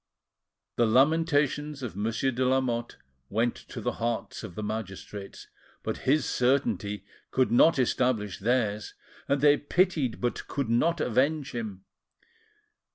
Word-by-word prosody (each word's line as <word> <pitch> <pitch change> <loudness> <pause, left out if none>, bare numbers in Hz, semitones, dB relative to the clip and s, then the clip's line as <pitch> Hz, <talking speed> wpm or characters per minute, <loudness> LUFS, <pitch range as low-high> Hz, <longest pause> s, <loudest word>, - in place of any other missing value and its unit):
The 120 - +4
lamentations 145 +2 +2
of 115 -7 -5
Monsieur 110 +6 0
de 130 +1 -1
Lamotte 125 -2 0 0.3
went 115 +3 +1
to - - -9
the - - -1
hearts 115 0 -2
of 85 - -8
the 105 - -4
magistrates, 105 -1 -6 0.4
but - - -2
his 150 +3 +3
certainty 110 -7 0 0.2
could 130 -2 +1
not 145 +7 +5
establish 120 -5 0
theirs, 105 -2 0 0.3
and 140 -1 +1
they 145 0 +6
pitied, 155 -6 +1
but 120 -1 -2
could 140 -5 -2
not 155 +8 +2
avenge 140 +5 +1
him. 105 -5 -6
125 Hz, 130 wpm, -28 LUFS, 110-140 Hz, 0.4 s, they